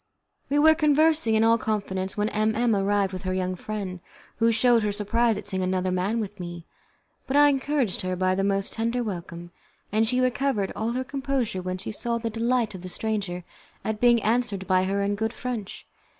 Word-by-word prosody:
We 285 Hz, -, +1 dB
were 315 Hz, +2 st, +7 dB
conversing 305 Hz, -5 st, +3 dB
in 220 Hz, -, +3 dB
all 230 Hz, +1 st, +4 dB
confidence 195 Hz, -3 st, -2 dB
when 210 Hz, +1 st, +1 dB
M 215 Hz, +1 st, 0 dB
M 230 Hz, -1 st, +2 dB
arrived 200 Hz, -1 st, +1 dB
with 185 Hz, -, -5 dB
her 185 Hz, -1 st, -2 dB
young 185 Hz, 0 st, -1 dB
friend, 190 Hz, -2 st, -5 dB, 0.4 s
who 230 Hz, 0 st, +3 dB
showed 235 Hz, +1 st, +4 dB
her 210 Hz, -1 st, 0 dB
surprise 220 Hz, +2 st, +1 dB
at 205 Hz, -1 st, -7 dB
seeing 190 Hz, -2 st, -1 dB
another 185 Hz, 0 st, 0 dB
man 190 Hz, +5 st, 0 dB
with 205 Hz, -2 st, -5 dB
me, 175 Hz, -1 st, -7 dB, 0.6 s
but 270 Hz, -, +1 dB
I 290 Hz, 0 st, +7 dB
encouraged 275 Hz, -5 st, 0 dB
her 185 Hz, 0 st, -2 dB
by 185 Hz, +1 st, +1 dB
the 195 Hz, +1 st, 0 dB
most 195 Hz, 0 st, +1 dB
tender 230 Hz, +2 st, -1 dB
welcome; 175 Hz, -4 st, -6 dB, 0.4 s
and 220 Hz, +2 st, +2 dB
she 250 Hz, +2 st, +2 dB
recovered 255 Hz, -5 st, 0 dB
all 225 Hz, +2 st, -2 dB
her 255 Hz, +1 st, -1 dB
composure 265 Hz, -7 st, -2 dB
when 185 Hz, 0 st, -3 dB
she 195 Hz, -, -5 dB
saw 235 Hz, +2 st, -2 dB
the 230 Hz, -1 st, -3 dB
delight 230 Hz, 0 st, 0 dB
of 185 Hz, -, -8 dB
the 185 Hz, -, -7 dB
stranger 200 Hz, -4 st, -2 dB, 0.4 s
at 220 Hz, -1 st, -2 dB
being 240 Hz, -2 st, +5 dB
answered 215 Hz, -4 st, 0 dB
by 185 Hz, 0 st, +2 dB
her 200 Hz, +1 st, 0 dB
in 200 Hz, +1 st, 0 dB
good 220 Hz, +3 st, -2 dB
French. 240 Hz, -7 st, -5 dB
215 Hz, 205 wpm, -25 LUFS, 190-240 Hz, 0.6 s, were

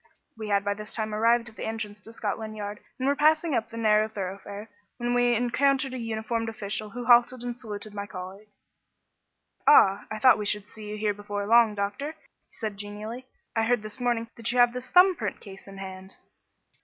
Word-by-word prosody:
We 220 Hz, -1 st, -6 dB
had 200 Hz, -1 st, +1 dB
by 205 Hz, -, +1 dB
this 210 Hz, +1 st, -7 dB
time 215 Hz, -1 st, -2 dB
arrived 230 Hz, +2 st, +3 dB
at 220 Hz, -, -19 dB
the -, -, -4 dB
entrance 215 Hz, -2 st, -5 dB
to 225 Hz, -, -12 dB
Scotland 215 Hz, 0 st, -4 dB
Yard, 205 Hz, 0 st, -5 dB, 0.2 s
and 260 Hz, -, -1 dB
were 280 Hz, -, +3 dB
passing 310 Hz, +2 st, +3 dB
up 225 Hz, -3 st, 0 dB
the 230 Hz, -, -9 dB
narrow 215 Hz, -1 st, +3 dB
thoroughfare, 200 Hz, +1 st, -6 dB, 0.3 s
when 240 Hz, 0 st, -1 dB
we 245 Hz, 0 st, +3 dB
encountered 265 Hz, +3 st, +1 dB
a 255 Hz, -, -4 dB
uniformed 225 Hz, 0 st, -2 dB
official 215 Hz, -1 st, -4 dB
who 240 Hz, +2 st, -6 dB
halted 240 Hz, +1 st, +5 dB
and 245 Hz, -1 st, -3 dB
saluted 215 Hz, -3 st, -7 dB
my 200 Hz, 0 st, -5 dB
colleague. 190 Hz, +3 st, -8 dB, 1.2 s
"Ah, 200 Hz, -8 st, +6 dB
I 215 Hz, -, -4 dB
thought 255 Hz, +1 st, +6 dB
we 210 Hz, -, -3 dB
should 210 Hz, 0 st, -1 dB
see 215 Hz, -1 st, -10 dB
you 210 Hz, -, -4 dB
here 210 Hz, -1 st, 0 dB
before 205 Hz, 0 st, -4 dB
long, 230 Hz, 0 st, +5 dB
doctor," 205 Hz, +10 st, -3 dB, 0.3 s
said 220 Hz, -1 st, -4 dB
he 200 Hz, -, -16 dB
genially. 210 Hz, +5 st, -7 dB, 0.3 s
"I 225 Hz, -, +2 dB
heard 240 Hz, -1 st, +1 dB
this 215 Hz, +4 st, -7 dB
morning 240 Hz, -2 st, 0 dB
that 230 Hz, +1 st, -2 dB
you 250 Hz, -, -2 dB
have 245 Hz, -1 st, +6 dB
this 250 Hz, 0 st, -7 dB
thumb 365 Hz, +1 st, +6 dB
print 215 Hz, -9 st, -4 dB
case 195 Hz, -1 st, -12 dB
in 195 Hz, 0 st, -10 dB
hand." 190 Hz, 0 st, -8 dB
220 Hz, 205 wpm, -27 LUFS, 205-240 Hz, 1.2 s, Ah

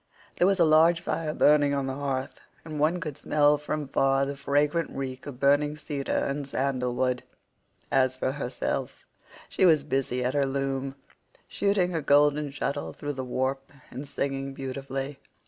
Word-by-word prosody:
There 180 Hz, -, +4 dB
was 195 Hz, -1 st, +2 dB
a 170 Hz, -, +6 dB
large 160 Hz, +2 st, +5 dB
fire 165 Hz, -2 st, -2 dB
burning 145 Hz, -1 st, +4 dB
on 140 Hz, -1 st, -1 dB
the 135 Hz, -, -3 dB
hearth, 135 Hz, -1 st, -3 dB, 0.3 s
and 155 Hz, -2 st, -5 dB
one 160 Hz, +4 st, +2 dB
could 155 Hz, -4 st, -6 dB
smell 150 Hz, -1 st, +3 dB
from 150 Hz, 0 st, -3 dB
far 135 Hz, 0 st, +2 dB
the 140 Hz, +1 st, -4 dB
fragrant 145 Hz, +4 st, +1 dB
reek 130 Hz, -1 st, -6 dB
of 130 Hz, -3 st, -8 dB
burning 145 Hz, +2 st, +3 dB
cedar 145 Hz, -2 st, -5 dB
and 140 Hz, 0 st, -3 dB
sandal 130 Hz, -3 st, -1 dB
wood. 125 Hz, 0 st, 0 dB, 0.7 s
As 130 Hz, -1 st, +3 dB
for 130 Hz, 0 st, -1 dB
herself, 135 Hz, -3 st, -4 dB, 0.4 s
she -, -, -1 dB
was 160 Hz, -5 st, +5 dB
busy 135 Hz, -3 st, -1 dB
at 125 Hz, -, 0 dB
her 145 Hz, -, +2 dB
loom, 135 Hz, 0 st, -2 dB, 0.5 s
shooting 200 Hz, -3 st, +1 dB
her 165 Hz, -2 st, -1 dB
golden 145 Hz, +1 st, +3 dB
shuttle 140 Hz, 0 st, -3 dB
through 145 Hz, 0 st, -5 dB
the 130 Hz, -1 st, -4 dB
warp 130 Hz, +2 st, -2 dB, 0.2 s
and 135 Hz, +3 st, -7 dB
singing 135 Hz, -1 st, -3 dB
beautifully. 135 Hz, +1 st, -5 dB
140 Hz, 165 wpm, -27 LUFS, 135-150 Hz, 0.7 s, a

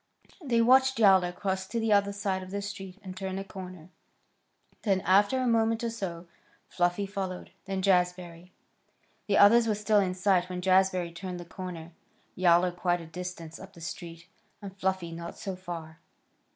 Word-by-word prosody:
They 235 Hz, -5 st, +2 dB
watched 260 Hz, +2 st, +5 dB
Yowler 190 Hz, -5 st, +5 dB
cross 190 Hz, 0 st, -3 dB
to 230 Hz, -, -2 dB
the 225 Hz, -1 st, +2 dB
other 200 Hz, 0 st, +3 dB
side 200 Hz, -2 st, -2 dB
of 185 Hz, -, -9 dB
the 200 Hz, +1 st, -4 dB
street 195 Hz, -2 st, -7 dB
and 185 Hz, -1 st, -8 dB
turn 190 Hz, 0 st, -4 dB
a 195 Hz, -, -3 dB
corner. 185 Hz, -3 st, -10 dB, 0.9 s
Then, 195 Hz, -3 st, +1 dB
after 200 Hz, +7 st, +3 dB
a 255 Hz, -, 0 dB
moment 230 Hz, -1 st, +2 dB
or 230 Hz, -, -1 dB
so, 180 Hz, -6 st, -5 dB, 0.4 s
Fluffy 175 Hz, +3 st, 0 dB
followed, 190 Hz, -2 st, -5 dB
then 195 Hz, -1 st, -3 dB
Jazbury. 180 Hz, -2 st, 0 dB, 0.8 s
The 200 Hz, -, +2 dB
others 230 Hz, +3 st, +6 dB
were 215 Hz, -, +1 dB
still 210 Hz, 0 st, +2 dB
in 185 Hz, -2 st, 0 dB
sight 185 Hz, -1 st, +2 dB
when 180 Hz, 0 st, -4 dB
Jazbury 185 Hz, -2 st, +2 dB
turned 180 Hz, 0 st, -6 dB
the 175 Hz, -, -8 dB
corner, 170 Hz, -1 st, -8 dB, 0.4 s
Yowler 180 Hz, 0 st, +4 dB
quite 175 Hz, 0 st, 0 dB
a -, -, -9 dB
distance 165 Hz, -1 st, -7 dB
up 190 Hz, -, -12 dB
the -, -, -14 dB
street, 165 Hz, 0 st, -8 dB, 0.3 s
and 195 Hz, -2 st, -9 dB
Fluffy 190 Hz, -3 st, -2 dB
not 170 Hz, +1 st, -7 dB
so 195 Hz, -2 st, -5 dB
far. 170 Hz, -3 st, -8 dB
190 Hz, 175 wpm, -28 LUFS, 175-200 Hz, 0.9 s, others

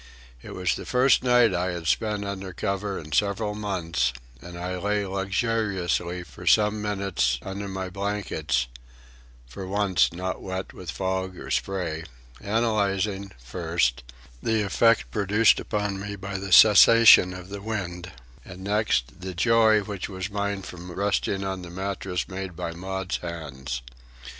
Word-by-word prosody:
It -, -, -9 dB
was 90 Hz, -1 st, 0 dB
the -, -, -6 dB
first 130 Hz, +2 st, +4 dB
night 125 Hz, -2 st, +4 dB
I 90 Hz, +1 st, -1 dB
had 85 Hz, -2 st, -6 dB
spent 105 Hz, +3 st, 0 dB
under 95 Hz, -2 st, -5 dB
cover 100 Hz, +2 st, -2 dB
in 75 Hz, -1 st, -9 dB
several 105 Hz, +4 st, +1 dB
months, 95 Hz, -, -1 dB, 0.3 s
and 85 Hz, 0 st, -9 dB
I 90 Hz, +1 st, -3 dB
lay 105 Hz, +2 st, 0 dB
luxuriously 95 Hz, -3 st, -1 dB
for 70 Hz, -7 st, -12 dB
some 105 Hz, 0 st, +4 dB
minutes 95 Hz, -11 st, 0 dB
under 100 Hz, +1 st, -5 dB
my 95 Hz, -1 st, -4 dB
blankets 100 Hz, -9 st, -1 dB, 0.8 s
(for 95 Hz, +10 st, -8 dB
once 100 Hz, -2 st, +2 dB
not 90 Hz, +2 st, -4 dB
wet 95 Hz, 0 st, -5 dB
with 90 Hz, -3 st, -9 dB
fog 95 Hz, +2 st, -2 dB
or -, -, -8 dB
spray), 85 Hz, -5 st, -2 dB, 0.4 s
analysing, 100 Hz, -2 st, 0 dB
first, 65 Hz, -1 st, -1 dB, 0.4 s
the 110 Hz, -1 st, +1 dB
effect 115 Hz, +3 st, +3 dB
produced 105 Hz, +2 st, +3 dB
upon 105 Hz, -2 st, -2 dB
me 100 Hz, +1 st, -5 dB
by 100 Hz, 0 st, -5 dB
the 95 Hz, 0 st, -6 dB
cessation 110 Hz, -1 st, +8 dB
of 90 Hz, 0 st, -10 dB
the 100 Hz, 0 st, -6 dB
wind, 90 Hz, -5 st, -4 dB, 0.3 s
and 95 Hz, 0 st, -10 dB
next, 100 Hz, -, 0 dB
the 95 Hz, 0 st, -6 dB
joy 110 Hz, +2 st, +4 dB
which 100 Hz, -2 st, -5 dB
was 95 Hz, +1 st, -5 dB
mine 100 Hz, -1 st, -2 dB
from 90 Hz, -1 st, -9 dB
resting 100 Hz, +1 st, 0 dB
on 95 Hz, -1 st, -3 dB
the 90 Hz, -, -9 dB
mattress 95 Hz, -1 st, -3 dB
made 95 Hz, -2 st, -6 dB
by 85 Hz, -, -4 dB
Maud's 95 Hz, +2 st, -4 dB
hands. 70 Hz, -8 st, -6 dB
95 Hz, 150 wpm, -25 LUFS, 90-105 Hz, 0.8 s, cessation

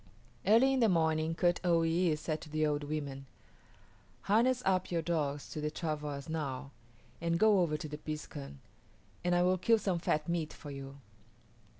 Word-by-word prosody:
Early 235 Hz, +6 st, +6 dB
in 265 Hz, -, +1 dB
the 230 Hz, -3 st, +4 dB
morning 160 Hz, -2 st, +1 dB
Kut 175 Hz, 0 st, +2 dB
o 170 Hz, -2 st, +3 dB
yis´ 165 Hz, -1 st, +2 dB
said 155 Hz, 0 st, -3 dB
to 155 Hz, -, -10 dB
the 155 Hz, 0 st, +1 dB
old 145 Hz, -1 st, -1 dB
women, 140 Hz, -3 st, -4 dB, 0.9 s
"Harness 240 Hz, +5 st, +2 dB
up 185 Hz, -1 st, +1 dB
your 170 Hz, -2 st, -1 dB
dogs 150 Hz, -4 st, -1 dB
to 155 Hz, -, -4 dB
the 150 Hz, -, -1 dB
travois 150 Hz, -3 st, -4 dB
now 140 Hz, -4 st, -4 dB, 0.5 s
and 170 Hz, 0 st, +1 dB
go 210 Hz, +1 st, +5 dB
over 160 Hz, -4 st, +1 dB
to 155 Hz, -, -6 dB
the 150 Hz, 0 st, -7 dB
piskun, 150 Hz, -, -7 dB, 0.6 s
and 175 Hz, 0 st, +2 dB
I 175 Hz, -, +4 dB
will 185 Hz, +1 st, +2 dB
kill 225 Hz, +5 st, +4 dB
some 190 Hz, -5 st, -1 dB
fat 155 Hz, -1 st, 0 dB
meat 170 Hz, -2 st, -1 dB
for 145 Hz, -, -9 dB
you." 135 Hz, 0 st, -8 dB
160 Hz, 180 wpm, -32 LUFS, 150-180 Hz, 0.9 s, Early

